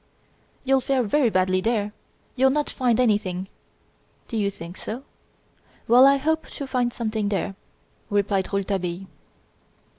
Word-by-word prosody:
"You'll 270 0 +3
fare 260 0 +1
very 240 +4 +2
badly 185 -1 +2
there; 210 -1 0 0.4
you'll 265 +1 +4
not 295 +2 0
find 245 -3 +1
anything 200 -6 +1 0.4
" - - -39
"Do 230 - -5
you 205 -2 +1
think 170 -2 -9
so? 240 +5 -6 0.8
Well, 250 +4 +8
I 275 0 +5
hope 320 +3 -1
to 280 - -6
find 250 -2 0
something 220 -3 -2
there," 195 -1 -1 0.6
replied 200 -1 0
Rouletabille. 195 -2 -2
220 Hz, 140 wpm, -24 LUFS, 195-260 Hz, 0.8 s, Well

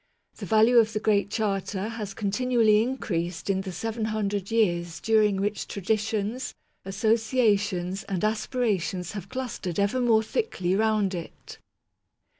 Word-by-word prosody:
The - - -7
value 220 +2 +5
of 220 -1 +2
the 215 - 0
Great 210 -1 +2
Charter 205 -1 -2
has 210 -3 -6
continually 220 0 +2
increased 185 -8 -2
in 190 0 0
the 190 -1 -6
seven 225 +4 -3
hundred 205 -3 -2
years 175 -7 +1
during 215 -2 +3
which 205 +1 -2
traditions, 215 +4 -2 0.3
associations, 205 -3 +1
and 190 -2 -3
aspirations 215 -5 -1
have 195 -2 -7
clustered 235 -8 -4
ever 200 +6 +1
more 225 -3 +4
thickly 205 - -1
round 215 -2 +1
it. 170 -2 -8
210 Hz, 130 wpm, -26 LUFS, 195-225 Hz, 0.3 s, value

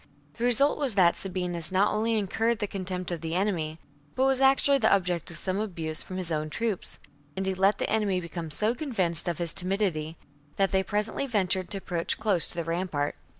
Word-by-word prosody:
The 235 - 0
result 275 +5 +3
was 270 -7 0
that 175 -3 +5
Sabinus 180 -3 -2
not 190 +2 +3
only 225 +2 +1
incurred 220 +3 0
the 210 - -2
contempt 185 -2 -4
of 170 -2 -3
the 165 0 -3
enemy, 175 -5 -1 0.4
but 260 - +2
was 270 -1 +2
actually 275 +1 +4
the 220 - +3
object 180 -4 +1
of 170 - -5
some 185 +3 -1
abuse 165 -7 -3
from 185 - -7
his 180 -3 -1
own 155 -1 -1
troops; 220 +2 -2 0.4
and 190 - -1
he 190 - 0
let 195 +2 +3
the - - -1
enemy 205 -4 +1
become 170 -1 -6
so 215 +9 +2
convinced 195 - -1
of 170 -3 -1
his 170 -2 -1
timidity 180 -5 -1 0.4
that 195 -1 +1
they 190 -1 +3
presently 210 +7 -2
ventured 190 -5 0
to 200 - -4
approach 175 -3 -2
close 205 -6 +5
to - - -2
the 170 - -2
rampart. 165 -3 -2
190 Hz, 205 wpm, -27 LUFS, 170-215 Hz, 0.4 s, that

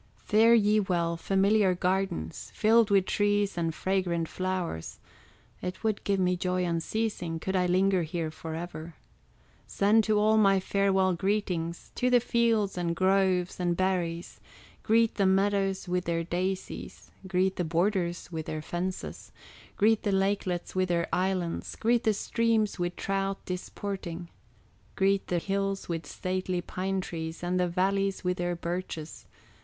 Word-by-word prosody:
Fare 225 +2 +4
ye 215 -1 +4
well, 170 -4 0
familiar 195 +2 +2
gardens 180 - -2
Filled 225 0 +4
with 195 -2 +4
trees 205 0 +1
and 165 -2 -1
fragrant 180 -3 0
flowers; 185 - -3 0.6
It 180 +4 -5
would 215 -2 0
give 200 -1 +1
me 180 -1 +2
joy 180 0 -1
unceasing, 170 0 -2
Could 190 +4 -3
I 180 -1 +2
linger 185 +1 +3
here 160 0 -3
forever. 160 0 -7 0.7
Send 210 +3 +3
to 215 -1 +2
all 215 +1 +4
my 195 -2 +5
farewell 190 -1 +2
greetings, 180 -3 -2
To 250 - +1
the 250 -1 +5
fields, 225 -5 +1
and 170 -1 -1
groves, 185 -1 +2
and 175 -1 0
berries; 175 -3 -1 0.4
Greet 225 +1 +3
the 195 -2 +3
meadows 195 0 +1
with 180 0 -1
their 165 0 0
daisies, 185 +3 -4 0.2
Greet 190 0 +1
the 180 - 0
borders 175 +1 0
with 160 -2 -5
their 155 -1 -4
fences, 180 +3 -5 0.5
Greet 220 +1 +4
the 205 - 0
lakelets 195 -2 0
with 185 -1 0
their 170 -1 +1
islands, 185 -2 -1
Greet 235 +2 +1
the 220 -1 +3
streams 225 -2 0
with 175 0 -1
trout 195 0 -1
disporting, 180 -2 -5 0.7
Greet 195 0 +2
the 180 - 0
hills 195 +2 -2
with 165 -1 -4
stately 185 0 -2
pine 190 +2 -2
trees, 165 -1 -6
And 180 +1 0
the 180 - +2
valleys 195 +3 0
with 180 0 0
their 175 0 -1
birches. 170 -2 -5
185 Hz, 145 wpm, -28 LUFS, 175-200 Hz, 0.7 s, my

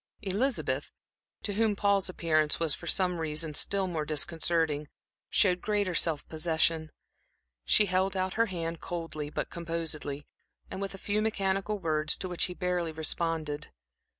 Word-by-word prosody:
Elizabeth, 225 +7 0 0.5
to 205 - -1
whom 215 0 +2
Paul's 200 -2 +2
appearance 155 -4 +1
was 165 -3 +3
for 170 - -7
some 180 -2 +2
reasons 155 -1 0
still 195 -1 +2
more 165 -4 -2
disconcerting, 155 0 +1 0.4
showed 180 -3 +4
greater 205 -3 +1
self 165 -3 +1
possession. 160 -1 +1 0.7
She 210 - +5
held 190 0 +1
out 185 0 0
her 230 +1 +3
hand 165 -3 -3
coldly, 165 -4 -4
but - - -3
composedly, 165 -4 -4 0.5
with 195 0 -4
a - - -8
few 205 +2 0
mechanical 200 -1 0
words, 155 -4 +1
to 185 - -3
which 180 -1 +1
he 180 - -5
barely 180 -2 0
responded. 155 -1 -2
170 Hz, 145 wpm, -30 LUFS, 160-195 Hz, 0.7 s, She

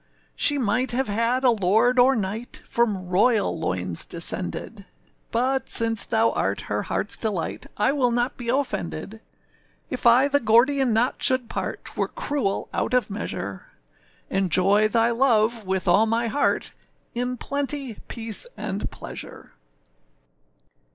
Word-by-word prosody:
âShe 290 -1 +3
might 245 +2 +1
have 260 -1 -1
had 230 +5 0
a 250 - +5
lord 225 +4 +2
or 260 +2 +5
knight, 215 +3 -5
From 210 -6 -1
royal 205 +4 +2
loins 90 - 0
descended; 185 +4 0 0.4
But, 260 +3 -1
since 225 -2 +5
thou 225 +1 +2
art - - -2
her - - -4
heartâs - - -2
delight, 205 -7 -3
I 210 +6 +2
will 270 -4 +1
not 240 +2 -1
be 240 -2 -6
offended; 95 - -3 0.7
âIf - - -4
I 250 +4 +5
the 285 0 +2
gordian 255 +3 +3
knot 230 +4 0
should 255 -2 +3
part, - - -5
âTwere - - -3
cruel 265 -10 -2
out 250 - -1
of 245 -4 0
measure; - - -6 0.6
Enjoy 195 +2 +2
thy 230 +1 +1
love, 230 -3 +1
with 190 0 -2
all 205 +6 +4
my 230 +1 0
heart, 260 +6 -1 0.4
In 250 +1 -3
plenty, 280 -3 -2
peace, 225 - +2
and 195 +2 -4
pleasure. - - -10
230 Hz, 140 wpm, -23 LUFS, 205-255 Hz, 0.7 s, a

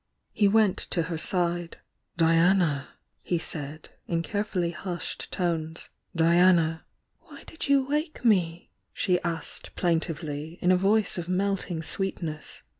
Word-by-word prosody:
He 205 - +3
went 205 -2 +3
to 170 - +1
her 165 0 -3
side. 175 -2 0 0.4
"Diana!" 165 -3 +3 0.3
he 175 - -1
said, 155 -2 -6 0.2
in 165 -1 0
care 205 +4 -1
fully 180 -5 -1
hudied 175 0 -5
tones. 165 -2 -2 0.3
"Diana 165 -1 +4 0.2
" - - -49
"Why - - -13
did 320 - -5
you 275 -1 +4
wake 300 -2 -2
me?" 175 -6 +2 0.2
she 180 -2 +1
asked 170 -2 -3
plaintively, 160 -2 -2
in 180 - +3
a - - +6
voice 200 +1 +2
of 175 0 -6
melting 185 -3 -1
sweetness. 165 -4 -3
175 Hz, 135 wpm, -27 LUFS, 165-195 Hz, 0.4 s, a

